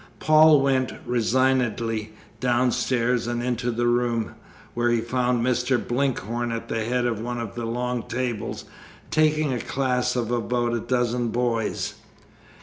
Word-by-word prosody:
Paul 155 Hz, -1 st, +6 dB
went 135 Hz, -2 st, +1 dB
resignedly 120 Hz, -3 st, +1 dB, 0.3 s
downstairs 125 Hz, -1 st, +1 dB
and 120 Hz, 0 st, -2 dB
into 125 Hz, 0 st, -1 dB
the 120 Hz, 0 st, 0 dB
room, 120 Hz, -2 st, +1 dB, 0.4 s
where 120 Hz, 0 st, +1 dB
he 120 Hz, -1 st, +2 dB
found 125 Hz, 0 st, 0 dB
Mr. 125 Hz, 0 st, +2 dB
Blinkhorn 120 Hz, -2 st, -1 dB
at 115 Hz, 0 st, -5 dB
the 115 Hz, -, -1 dB
head 125 Hz, +2 st, 0 dB
of 115 Hz, -3 st, -1 dB
one 120 Hz, +1 st, -3 dB
of 115 Hz, -3 st, -5 dB
the 120 Hz, -1 st, -4 dB
long 125 Hz, +1 st, -2 dB
tables, 120 Hz, -2 st, -3 dB, 0.5 s
taking 155 Hz, -2 st, +2 dB
a 125 Hz, -, -2 dB
class 125 Hz, -1 st, 0 dB
of 120 Hz, -2 st, -1 dB
about 120 Hz, 0 st, 0 dB
a 120 Hz, -, 0 dB
dozen 120 Hz, 0 st, 0 dB
boys. 115 Hz, -2 st, -1 dB
120 Hz, 145 wpm, -24 LUFS, 115-125 Hz, 0.5 s, Paul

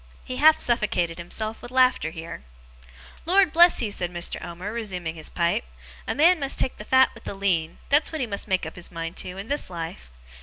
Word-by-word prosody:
He 255 Hz, -, -5 dB
half 310 Hz, +3 st, +6 dB
suffocated 185 Hz, -8 st, 0 dB
himself 215 Hz, +6 st, -5 dB
with 245 Hz, -, -9 dB
laughing 255 Hz, -11 st, +3 dB
here. 160 Hz, -, -8 dB, 0.8 s
'Lord 375 Hz, -2 st, +4 dB
bless 345 Hz, -4 st, +6 dB
you!' 210 Hz, -, -2 dB
said 175 Hz, -3 st, -2 dB
Mr. 175 Hz, -1 st, -3 dB
Omer, 180 Hz, +5 st, -6 dB
resuming 185 Hz, -8 st, -3 dB
his 160 Hz, -2 st, -7 dB
pipe, 170 Hz, -1 st, 0 dB, 0.4 s
'a -, -, -1 dB
man 335 Hz, +4 st, +5 dB
must 275 Hz, -1 st, -1 dB
take 260 Hz, -, 0 dB
the -, -, -8 dB
fat 260 Hz, +4 st, +4 dB
with 230 Hz, -, -15 dB
the -, -, -5 dB
lean; 175 Hz, -5 st, 0 dB
that's 295 Hz, +2 st, +3 dB
what 315 Hz, -, -4 dB
he 255 Hz, -, 0 dB
must 205 Hz, -2 st, -4 dB
make 190 Hz, -4 st, 0 dB
up 160 Hz, -, -7 dB
his 180 Hz, -, -8 dB
mind 165 Hz, 0 st, -5 dB
to, 180 Hz, +1 st, -5 dB
in 195 Hz, +3 st, -7 dB
this 290 Hz, -5 st, -3 dB
life. 165 Hz, -, -7 dB
200 Hz, 215 wpm, -25 LUFS, 170-260 Hz, 0.8 s, half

